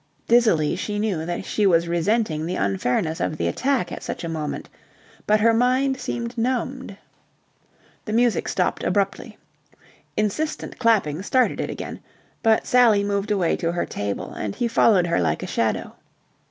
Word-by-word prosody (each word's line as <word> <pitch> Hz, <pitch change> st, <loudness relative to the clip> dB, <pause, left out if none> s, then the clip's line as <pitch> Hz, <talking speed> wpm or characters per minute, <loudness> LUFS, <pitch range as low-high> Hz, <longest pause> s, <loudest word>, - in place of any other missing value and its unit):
Dizzily 215 Hz, -11 st, +3 dB
she 205 Hz, +3 st, -3 dB
knew 195 Hz, -7 st, -1 dB
that 175 Hz, +2 st, -3 dB
she 210 Hz, -2 st, +1 dB
was 170 Hz, -2 st, +3 dB
resenting 170 Hz, -1 st, 0 dB
the 180 Hz, -, -2 dB
unfairness 125 Hz, -, 0 dB
of 155 Hz, -, -2 dB
the -, -, -1 dB
attack 260 Hz, -10 st, 0 dB
at -, -, -6 dB
such -, -, -5 dB
a -, -, -3 dB
moment, 155 Hz, -2 st, -4 dB, 0.6 s
but 215 Hz, 0 st, +3 dB
her 230 Hz, +1 st, +5 dB
mind 255 Hz, +3 st, +2 dB
seemed 240 Hz, -2 st, -4 dB
numbed. 250 Hz, -2 st, -2 dB, 1.1 s
The 215 Hz, -, -4 dB
music 240 Hz, 0 st, +2 dB
stopped -, -, -1 dB
abruptly. 195 Hz, -1 st, -1 dB, 0.8 s
Insistent 300 Hz, +10 st, -2 dB
clapping 200 Hz, -, +2 dB
started 255 Hz, +5 st, +1 dB
it -, -, -3 dB
again, -, -, -6 dB, 0.4 s
but 220 Hz, -1 st, +3 dB
Sally 235 Hz, -5 st, +4 dB
moved 200 Hz, +1 st, -1 dB
away 190 Hz, -5 st, +1 dB
to 170 Hz, 0 st, -1 dB
her 175 Hz, -, -1 dB
table, 100 Hz, 0 st, -4 dB
and 105 Hz, -2 st, -4 dB
he 240 Hz, -, 0 dB
followed 215 Hz, -5 st, +4 dB
her 170 Hz, -, +1 dB
like 80 Hz, -2 st, 0 dB
a -, -, -2 dB
shadow. -, -, -1 dB
205 Hz, 160 wpm, -23 LUFS, 170-235 Hz, 1.1 s, her